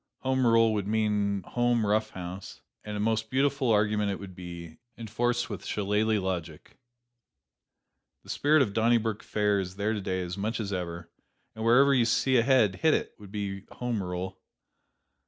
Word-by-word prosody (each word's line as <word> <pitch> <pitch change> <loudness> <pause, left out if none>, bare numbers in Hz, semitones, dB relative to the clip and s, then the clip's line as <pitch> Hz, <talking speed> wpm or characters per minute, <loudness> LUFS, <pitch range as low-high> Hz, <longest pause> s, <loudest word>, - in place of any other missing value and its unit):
Home 130 -1 +1
rule 115 -1 +4
would 100 -2 -2
mean 105 -2 0
home 120 0 +1
rough 110 +1 +1
house 90 +1 -8 0.2
and 105 -1 -5
a - - -4
most 110 +1 0
beautiful 135 0 +1
argument 105 -1 +2
it 100 - -3
would 95 -2 -9
be, 85 -2 -9 0.2
enforced 120 +2 -1
with - - -7
shillalah 105 +1 0
logic. 85 - -5 1.4
The - - -7
spirit 150 0 +4
of 100 - -4
Donnybrook 110 -1 +1
Fair 105 -1 0
is 95 -1 -5
there 105 +2 -1
today 95 -3 -2
as 90 +2 -6
much 110 +4 -2
as 100 -2 -3
ever, 85 -2 -5 0.4
and 110 - -6
wherever 135 +5 +5
you 125 -3 +3
see 130 +3 +2
a - - +5
head, 115 -7 +3
hit 160 - +3
it, - - -3
would 100 -2 -12
be 100 -2 -4
home 120 -4 -2
rule. 90 +1 -5
105 Hz, 170 wpm, -28 LUFS, 95-115 Hz, 1.4 s, wherever